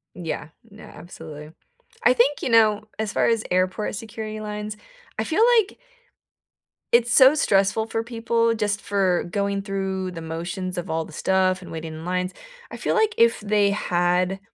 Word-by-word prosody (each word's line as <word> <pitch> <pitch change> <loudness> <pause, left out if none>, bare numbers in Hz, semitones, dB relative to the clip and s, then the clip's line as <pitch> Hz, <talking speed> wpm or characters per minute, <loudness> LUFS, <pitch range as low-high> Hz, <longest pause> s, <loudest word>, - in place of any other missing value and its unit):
Yeah. 165 -3 -5 0.2
No, 215 +1 -14
absolutely. 155 -3 -11 0.5
I 245 - +6
think, 260 +4 +2
you - - -2
know, 215 -2 +4
as 215 -1 -3
far - - +2
as 225 -2 +1
airport 185 +3 0
security 215 0 -6
lines, 210 0 -5 0.4
I - - +1
feel 405 +8 +2 0.2
like 400 -1 -3 1.2
it's 240 0 +4
so 265 +3 +7
stressful 205 -4 +2
for 225 0 -2
people 230 0 0
just 210 -1 -1
for 190 -3 +1
going 200 -1 -1
through 190 -2 -3
the 165 -2 -8
motions 175 +3 -5
of 175 0 -4
all 160 0 -1
the 160 - -13
stuff 185 +2 +1
and - - -11
waiting 160 -1 -6
in 160 +1 -9
lines. 180 +1 -1 0.4
I - - -7
feel - - -1
like 440 -1 +2
if 230 0 +4
they 205 -1 +2
had 180 0 0
200 Hz, 170 wpm, -23 LUFS, 180-225 Hz, 1.2 s, so